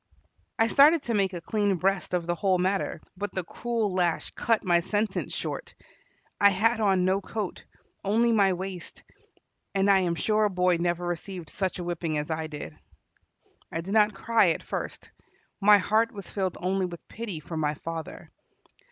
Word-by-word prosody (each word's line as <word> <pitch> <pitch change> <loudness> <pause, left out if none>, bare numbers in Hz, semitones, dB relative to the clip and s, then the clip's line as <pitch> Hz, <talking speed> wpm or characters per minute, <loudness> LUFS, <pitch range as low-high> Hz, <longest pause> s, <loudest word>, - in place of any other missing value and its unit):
I 225 - +4
started 285 +6 +5
to 235 - -2
make 195 -3 +1
a 175 - -5
clean 205 +2 0
breast 190 +1 0
of 175 -2 -1
the 175 - 0
whole 185 +1 +1
matter, 190 +2 -1
but 205 0 -5
the 185 - -1
cruel 225 +2 -2
lash 175 -3 0
cut 230 -2 0
my 175 -2 +4
sentence 205 +5 -1
short. - - -5 0.6
I 200 - +7
had 220 +4 +2
on 190 -4 +3
no 190 +2 +2
coat, 205 -1 -5 0.4
only 230 +4 +3
my 200 -4 +4
waist, 185 -1 -7 0.7
and 195 +1 +4
I 195 - +5
am 175 -2 0
sure 215 +4 +2
a - - +2
boy 180 -2 +2
never 175 +1 -1
received 175 0 -5
such 190 -2 -2
a 180 - -4
whipping 170 -2 -2
as 150 +2 -3
I 160 0 -2
did. 145 - -7 1.0
I 165 - -2
did 190 +4 -5
not 210 -2 +4
cry 225 -1 +3
at 165 - -1
first. - - -5 0.5
My 210 0 +7
heart 215 +4 +2
was 200 -4 -9
filled 190 -3 -2
only 185 +1 0
with 170 -1 -10
pity 220 -8 -6
for 160 +2 -8
my 150 -1 0
father. 165 +1 -7
190 Hz, 180 wpm, -27 LUFS, 175-210 Hz, 1.0 s, I